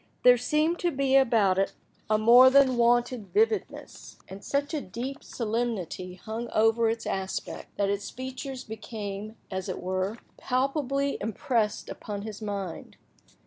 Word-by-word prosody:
There 250 Hz, 0 st, +8 dB
seemed 305 Hz, +7 st, +1 dB
to 350 Hz, -, +1 dB
be 275 Hz, -3 st, +1 dB
about 225 Hz, -8 st, +4 dB
it 195 Hz, -, 0 dB, 0.4 s
a 215 Hz, -, +4 dB
more 240 Hz, +4 st, +8 dB
than 265 Hz, -1 st, +5 dB
wonted 240 Hz, -2 st, +2 dB
vividness, 440 Hz, 0 st, -1 dB
and 195 Hz, +1 st, -10 dB
such 285 Hz, +2 st, -1 dB
a 305 Hz, -, -1 dB
deep 250 Hz, +8 st, -6 dB
solemnity 215 Hz, -6 st, -3 dB
hung 225 Hz, +5 st, -6 dB
over 225 Hz, +1 st, +4 dB
its 225 Hz, 0 st, -3 dB
aspect, 190 Hz, 0 st, -4 dB
that 200 Hz, -, +1 dB
its 200 Hz, 0 st, -3 dB
features 260 Hz, +1 st, -6 dB
became, 215 Hz, -1 st, -6 dB, 0.2 s
as 190 Hz, -1 st, -4 dB
it -, -, -3 dB
were, 185 Hz, +4 st, -2 dB, 0.2 s
palpably 275 Hz, +1 st, 0 dB
impressed 220 Hz, 0 st, -1 dB
upon 205 Hz, -1 st, -6 dB
his 215 Hz, 0 st, -7 dB
mind. 200 Hz, -5 st, -5 dB
230 Hz, 145 wpm, -27 LUFS, 205-260 Hz, 0.4 s, There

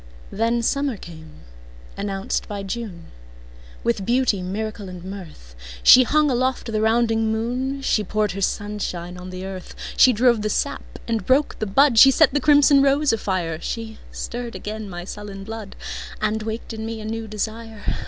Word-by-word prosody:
Then 230 Hz, +2 st, 0 dB
summer 275 Hz, -1 st, 0 dB
came, 160 Hz, -4 st, -12 dB, 0.5 s
announced 195 Hz, -1 st, -3 dB
by 200 Hz, -1 st, -5 dB
June, 195 Hz, -5 st, -6 dB, 0.7 s
With 195 Hz, -, 0 dB
beauty, 235 Hz, -3 st, +2 dB
miracle 205 Hz, +1 st, -4 dB
and 180 Hz, -1 st, -9 dB
mirth. 180 Hz, -, -10 dB, 0.3 s
She 255 Hz, -, +10 dB
hung 300 Hz, +2 st, +3 dB
aloft 255 Hz, -1 st, 0 dB
the 215 Hz, -1 st, 0 dB
rounding 225 Hz, 0 st, +2 dB
moon, 255 Hz, +5 st, -2 dB
She 215 Hz, -, +2 dB
poured 210 Hz, +1 st, 0 dB
her 195 Hz, -, -5 dB
sunshine 190 Hz, -4 st, -3 dB
on 180 Hz, 0 st, -8 dB
the 185 Hz, +1 st, -6 dB
earth, 190 Hz, -1 st, -8 dB, 0.2 s
She 255 Hz, -, +7 dB
drove 235 Hz, -1 st, +3 dB
the 215 Hz, -, -1 dB
sap -, -, -3 dB
and 225 Hz, -2 st, -1 dB
broke 275 Hz, +3 st, +2 dB
the 215 Hz, -, -2 dB
bud, 250 Hz, +3 st, +5 dB
She 270 Hz, -, +10 dB
set 310 Hz, +4 st, +4 dB
the 290 Hz, -, +2 dB
crimson 290 Hz, -1 st, +6 dB
rose 280 Hz, 0 st, +3 dB
afire. 180 Hz, -7 st, -2 dB
She 225 Hz, -1 st, -5 dB
stirred 240 Hz, 0 st, -5 dB
again 215 Hz, 0 st, -6 dB
my 175 Hz, -1 st, -6 dB
sullen 200 Hz, +1 st, -8 dB
blood, 220 Hz, -1 st, -7 dB, 0.4 s
And 215 Hz, +1 st, 0 dB
waked 220 Hz, +2 st, -5 dB
in 220 Hz, 0 st, -6 dB
me 225 Hz, 0 st, -4 dB
a 215 Hz, -, -7 dB
new 225 Hz, 0 st, -4 dB
desire. 220 Hz, +1 st, -5 dB
220 Hz, 170 wpm, -22 LUFS, 195-235 Hz, 0.7 s, She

